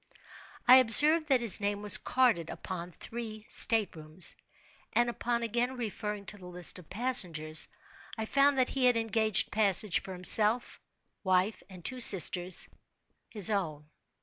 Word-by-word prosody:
I 255 +1 +7
observed 300 +6 +3
that 265 -4 0
his 225 -3 0
name 205 0 -4
was 205 - +8
carded 230 -11 -1
upon 180 -1 -9
three 220 +3 -10
state 220 -6 +1
rooms; 155 +3 -2 0.6
and, 240 0 0
upon 235 0 -5
again 240 +3 -4
referring 210 -3 -7
to 205 - -7
the 180 - -14
list 180 0 -5
of 170 - -19
passengers, 180 -9 +1 0.5
I 220 - -5
found 275 +3 0
that 255 -1 0
he 265 -2 -2
had 245 -2 +2
engaged 220 -1 -1
passage 205 -2 0
for 190 - -11
himself, 210 +6 +6 0.4
wife, 185 +2 -2
and 180 -3 -15
two 255 - -4
sisters—his 190 +1 -1
own. 155 -7 -6
215 Hz, 145 wpm, -28 LUFS, 180-240 Hz, 0.6 s, was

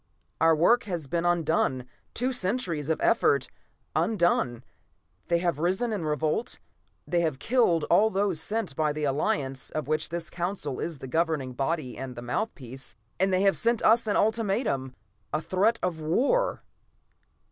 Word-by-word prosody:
Our 165 0 +5
work 215 +10 +4
has 175 -7 -3
been 170 +5 -1
undone. 160 -7 +1 0.3
Two 255 +2 0
centuries 185 - -1
of 160 - +1
effort - - +3 0.5
undone. 170 - +1 0.6
They 170 - +3
have 170 -3 -1
risen 190 +8 0
in 190 -6 -3
revolt, 155 - -1 0.5
they 175 -1 +1
have 155 -5 0
killed 225 - +2
all 205 +8 +4
those 195 -4 0
sent 220 -6 -2
by 155 -1 +1
the 150 0 -4
Alliance 135 -1 -1
of 155 -3 -4
which 155 0 0
this 170 0 -5
Council 175 -6 -3
is 165 -3 -3
the 135 - -8
governing 155 -3 0
body 135 -1 -2
and 130 -1 -6
the 120 - -7
mouthpiece, 130 - -4 0.2
and 190 +1 +2
they 185 +1 +2
have 195 -1 +4
sent 235 -1 +1
us 230 +1 +4
an 205 - +1
ultimatum 200 - 0 0.4
a 155 - 0
threat 200 +8 +1
of 175 -3 -1
war!" 275 - +1
170 Hz, 160 wpm, -27 LUFS, 150-200 Hz, 0.6 s, Our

